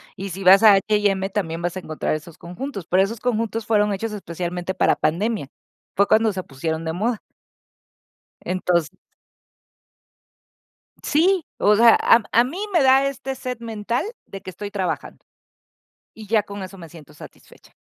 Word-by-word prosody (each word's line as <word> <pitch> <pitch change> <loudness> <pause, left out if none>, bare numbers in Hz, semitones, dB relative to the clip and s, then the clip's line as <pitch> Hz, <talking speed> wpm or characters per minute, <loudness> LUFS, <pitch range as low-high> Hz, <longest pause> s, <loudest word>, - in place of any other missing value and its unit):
y 195 +1 -6
si 195 +2 -6
vas 190 +3 +7
a 215 -2 +9
H&M 195 -1 +1
también 170 -5 -3
vas 175 0 -2
a - - -3
encontrar 155 -3 -3
esos 155 +1 -9
conjuntos, 195 - -7
pero 185 +2 +3
esos 225 +3 -4
conjuntos 225 -2 -2
fueron 210 -2 +2
hechos 220 +3 -4
especialmente 180 -1 -4
para - - +3
pandemia. 200 - -1 0.5
Fue 200 +1 +3
cuando 220 0 +3
se 185 -1 -4
pusieron 160 +4 -4
de 160 - -2
moda. 220 +5 -2 1.2
Entonces 180 -3 0 2.1
Sí, 345 +3 +2
o 210 0 +4
sea, 230 +1 +7
a 230 - +5
a 235 +2 +5
mí 350 +11 -4
me 340 -5 +4
da 270 +1 +5
este 270 0 -4
set 250 -2 -6
mental 230 0 -3 0.2
de 195 - -9
que 185 - -8
estoy 205 +2 -7
trabajando. 190 -2 -4 0.9
Y 220 -1 -11
ya 215 0 +2
con 200 -1 -8
eso 190 +1 -9
me 170 -2 -10
siento 150 -2 -15
satisfecha. - - -16
200 Hz, 160 wpm, -22 LUFS, 180-230 Hz, 2.1 s, a